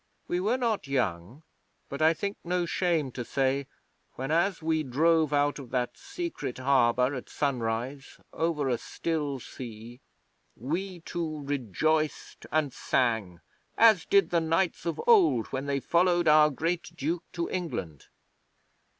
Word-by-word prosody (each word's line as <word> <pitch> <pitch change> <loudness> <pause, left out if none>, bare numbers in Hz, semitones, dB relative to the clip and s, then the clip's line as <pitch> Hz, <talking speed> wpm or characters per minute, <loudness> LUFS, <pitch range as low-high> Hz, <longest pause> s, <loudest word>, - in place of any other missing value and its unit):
We 175 - 0
were 215 +7 +1
not 230 - -1
young, 120 - -2 0.4
but 140 +2 -6
I 160 +1 +5
think 200 +4 -3
no 175 0 0
shame 165 -6 0
to 125 - -5
say 135 +2 0 0.5
whenas 165 +8 0
we 160 0 0
drove 155 +3 +2
out 145 0 +1
of 130 -4 -9
that 125 -1 -1
secret 340 - -5
harbour 130 -1 +3
at 130 - -6
sunrise 130 0 -3
over 160 -3 0
a 120 -3 0
still 150 -5 -3
sea, 120 0 -9 0.6
we 175 - -4
two 160 -3 -4
rejoiced 145 +4 -1
and 150 -3 +1
sang 110 -8 0 0.4
as 220 -6 +6
did 195 -4 +3
the 170 -1 +3
knights 165 +2 0
of 165 - -2
old 390 - +5
when 135 +1 -3
they 140 -1 0
followed 175 +3 +2
our 150 0 +7
great 165 +5 -2
Duke 165 +3 -2
to 170 -1 -2
England. 90 - -4
150 Hz, 140 wpm, -28 LUFS, 130-170 Hz, 0.6 s, our